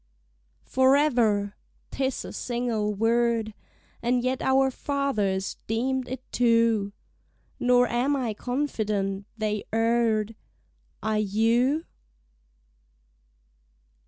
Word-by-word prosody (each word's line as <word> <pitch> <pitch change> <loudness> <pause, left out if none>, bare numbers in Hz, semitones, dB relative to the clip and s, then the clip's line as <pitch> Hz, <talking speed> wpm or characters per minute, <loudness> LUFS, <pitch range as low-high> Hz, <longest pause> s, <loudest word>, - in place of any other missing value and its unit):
Forever! 250 -7 +3 0.4
'Tis 265 -1 -2
a - - -8
single 235 -4 -1
word! 230 0 +1 0.5
And 245 +1 +1
yet 255 +1 -1
our 265 0 +3
fathers 220 -10 -1
deem'd 255 +3 -1
it 260 0 -5
two: 230 -4 +2 0.7
Nor 245 0 +4
am 250 +5 +1
I 245 -5 -1
confident 210 -6 -2
they 210 -1 -1
err'd; 225 -1 +1 0.7
Are 215 0 +1
you? 230 - +2
235 Hz, 85 wpm, -26 LUFS, 215-260 Hz, 0.7 s, Nor